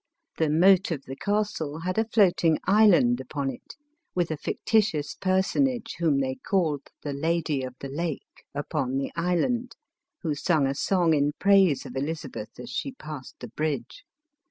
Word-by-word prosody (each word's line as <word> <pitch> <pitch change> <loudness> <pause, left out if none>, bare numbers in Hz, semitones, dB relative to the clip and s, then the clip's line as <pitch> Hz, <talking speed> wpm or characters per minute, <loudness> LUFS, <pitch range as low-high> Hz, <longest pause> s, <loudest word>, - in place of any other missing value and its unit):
The 160 -2 +2
moat 185 +5 +5
of 150 -5 -3
the 135 - -7
castle 165 -5 -2
had 185 +4 -1
a 220 - +1
floating 175 -7 +3
island 185 - +5
upon 135 +1 -3
it, 125 - -12 0.4
with 175 -2 0
a - - 0
fictitious 200 -5 0
personage 225 +6 0
whom 155 -5 +2
they 130 -1 -2
called 160 -8 0 0.2
the 145 - -3
Lady 160 -1 0
of 130 -1 -6
the 140 - -4
Lake, 155 +2 -5
upon 140 -2 -2
the 135 - -2
island, 180 +9 0 0.5
who 160 -3 0
sung 150 0 +1
a 135 - 0
song 170 +2 +2
in 145 0 +2
praise 195 -7 +4
of 125 - -9
Elizabeth 140 -6 -5
as 125 0 -8
she 260 - -3
passed 150 - -9
the 120 - -7
bridge. 145 0 -3
160 Hz, 160 wpm, -26 LUFS, 140-190 Hz, 0.5 s, moat